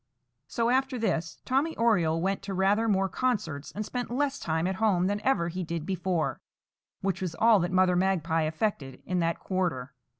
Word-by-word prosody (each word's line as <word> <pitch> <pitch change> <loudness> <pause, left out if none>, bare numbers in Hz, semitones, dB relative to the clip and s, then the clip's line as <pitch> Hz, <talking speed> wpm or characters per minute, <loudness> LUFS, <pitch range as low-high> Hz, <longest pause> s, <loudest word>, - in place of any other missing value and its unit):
So, 230 +11 0
after 265 0 +1
this, 170 -7 -1
Tommy 280 +5 0
Oriole 170 -8 +2
went 195 +1 0
to 195 -1 -5
rather 200 +4 +2
more 195 -2 +2
concerts, 190 - -2
and 210 +1 -4
spent 245 +2 -4
less 280 +3 -1
time 160 +1 -1
at 190 +1 -1
home 195 -5 +2
than 205 +2 -1
ever 260 -10 +1
he 180 +2 -4
did 165 -2 -4
before, 185 -3 -1 0.6
which 190 -1 -1
was 175 -3 -3
all 225 +1 +5
that 175 +1 -1
Mother 185 -1 +3
Magpie 170 -4 +1
effected 155 - -3
in 180 -1 -1
that 165 0 0
quarter. 170 -9 -2
190 Hz, 180 wpm, -28 LUFS, 165-220 Hz, 0.6 s, all